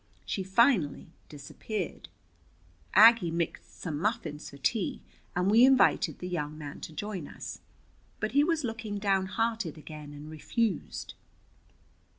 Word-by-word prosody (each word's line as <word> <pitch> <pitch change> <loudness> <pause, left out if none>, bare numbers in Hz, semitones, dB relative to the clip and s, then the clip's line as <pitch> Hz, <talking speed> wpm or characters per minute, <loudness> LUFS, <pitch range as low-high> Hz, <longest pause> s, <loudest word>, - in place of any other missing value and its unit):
She 195 - -2
finally 190 - +2 0.2
disappeared. 165 +7 -6 0.9
Aggie 225 -4 +8
mixed 170 0 -4
some 155 -5 -3
muffins 170 -7 -2
for 140 - -12
tea, 200 - -1 0.3
and 180 +3 +2
we 230 +3 +7
invited 255 - +4
the 180 - -6
young 155 -4 -3
man 150 -1 -7
to - - -7
join 185 -2 -5
us. - - -8 0.6
But - - -1
he 285 +1 +4
was 325 -1 +1
looking 225 -3 -4
downhearted 200 -1 0
again 150 -1 -9
and 145 +1 -9
refused. 200 +4 -2
190 Hz, 130 wpm, -29 LUFS, 155-225 Hz, 0.9 s, Aggie